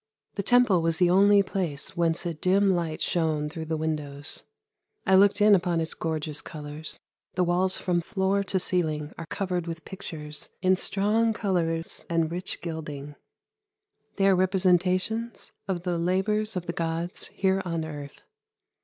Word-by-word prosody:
The 200 - -2
Temple 230 -4 +4
was 165 0 +1
the 175 0 +4
only 200 +2 +6
place 180 -7 -3
whence 170 0 +1
a 170 - -1
dim 190 +5 +3
light 170 -3 -1
shone 155 -3 0
through 160 +1 -6
the 160 0 -2
windows. 150 -2 -3 0.6
I 190 - +3
looked 200 +2 +5
in 210 0 +7
upon 175 -3 +2
its 160 0 -1
gorgeous 155 -2 -3
colours. 150 0 -7 0.4
The 180 - +2
walls 180 +2 +2
from 175 -2 0
floor 195 +1 0
to 190 0 0
ceiling 155 -5 -1
are 165 - -6
covered 180 -2 -2
with 165 0 -6
pictures 155 -6 -6
in 185 0 +4
strong 210 +4 +2
colours 170 -6 -1
and 165 -1 +1
rich 180 +2 -4
gilding. 150 -4 -6 1.0
They 195 - +2
are 195 -1 +6
representations 185 +4 +1 0.2
of 180 -3 -2
the 175 -2 -1
labours 210 +5 +1
of 180 -2 -3
the 170 - -3
gods 165 +1 -3
here 190 0 +1
on 165 -2 -2
earth. 145 -2 -8
175 Hz, 155 wpm, -27 LUFS, 160-190 Hz, 1.0 s, in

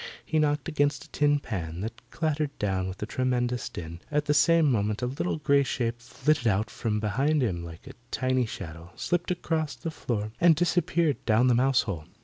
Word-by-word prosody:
He 155 - +1
knocked 150 -2 +1
against 145 -4 +1
a - - -20
tin 145 0 +3
pan 85 - -5
that 115 +2 -5
clattered 155 -2 -1
down 95 -2 -1
with 95 +2 -6
a - - 0
tremendous 125 0 -1
din. 85 0 -7
At 150 0 0
the 150 - +2
same 165 +2 +5
moment 105 0 0
a - - +2
little 135 +7 -2
grey 140 -2 +3
shape 120 -3 -2
flitted 130 +1 0
out 105 +1 +1
from 105 -2 -1
behind 135 +8 +1
him 90 -7 -1
like 85 -1 -10
a - - -9 0.2
tiny 130 -1 +1
shadow, 85 -4 -8
slipped 175 0 -1
across 160 -4 -1
the 165 - -5
floor 110 -8 -3
and 170 -1 +7
disappeared 170 -2 +1
down 115 +3 +4
the - - +5
mouse 130 +2 +4
hole. 85 -8 -5
125 Hz, 195 wpm, -27 LUFS, 105-150 Hz, 0.2 s, and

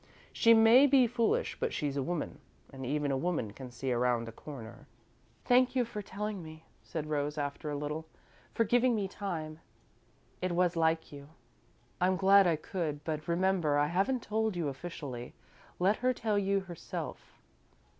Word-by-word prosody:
She 230 0 +6
may 225 +5 +7
be 265 -2 +5
foolish, 245 - 0
but 475 -1 -1
she's 145 -2 -2
a 140 - 0
woman, 170 +3 -3 0.3
and 135 0 -7
even 145 +2 -1
a 135 - +1
woman 145 - -2
can 130 +2 -9
see 125 +2 -4
around 120 -1 +1
a - - -6
corner." 125 +1 -10 0.6
"Thank 255 +1 +4
you 250 -2 +2
for 210 -2 -6
telling 205 0 -5
me," 160 0 -11 0.2
said 160 -2 -5
Rose, 150 0 -2
after 145 +1 -3
a 145 - -2
little; 150 +2 -4 0.4
"for 230 - +2
giving 245 +2 +3
me 200 -3 -1
time. 165 -6 -5 0.8
It 185 -1 -1
was 175 0 +2
like 160 0 +1
you." 140 0 -11 0.7
"I'm 185 +1 +3
glad 195 +1 +6
I 170 - +3
could, 155 -2 -4
but 155 -1 -4
remember, 170 -3 +2
I 145 - +3
haven't 200 +9 0
told 220 -1 -1
you, 165 -4 -1
officially. 135 -5 -7 0.4
Let 195 +4 +2
her 255 +1 +1
tell 215 -3 0
you 195 0 +1
herself." 175 -3 -7
170 Hz, 170 wpm, -31 LUFS, 145-205 Hz, 0.8 s, may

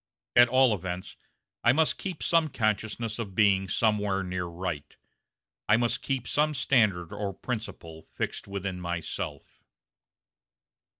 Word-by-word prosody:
At 120 0 +8
all 130 -2 +5
events, 90 -1 -5 0.5
I 120 - +6
must 160 +2 +2
keep 185 -5 -4
some 165 -2 +3
consciousness 110 -2 -1
of 100 -5 -5
being 95 -2 +4
somewhere 105 -1 +1
near 90 -1 -3
right. 85 -3 -5 0.7
I 105 - +6
must 120 +2 0
keep 130 -4 -2
some 150 +1 +1
standard 105 -10 +2
or 100 -1 -3
principle 85 -9 -6
fixed - - -3
within 100 -2 -4
myself." 85 -1 -5
105 Hz, 125 wpm, -28 LUFS, 95-120 Hz, 0.7 s, At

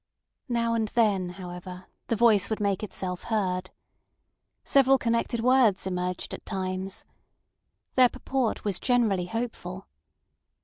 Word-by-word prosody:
Now 235 -1 +1
and 225 -1 +1
then, 205 -5 +2
however, 180 0 -8 0.2
the 230 - +1
voice 215 -3 +4
would 220 - -1
make 200 -2 0
itself 185 -3 -4
heard. 185 -5 -1 0.9
Several 270 -1 +5
connected 235 -1 0
words 245 -6 +4
emerged 180 -1 -3
at - - -7
times. 190 -1 -4 0.9
Their 255 -1 +6
purport 260 -3 -2
was 200 -3 -1
generally 220 -8 +2
hopeful. 225 - -5
210 Hz, 120 wpm, -27 LUFS, 185-235 Hz, 0.9 s, Their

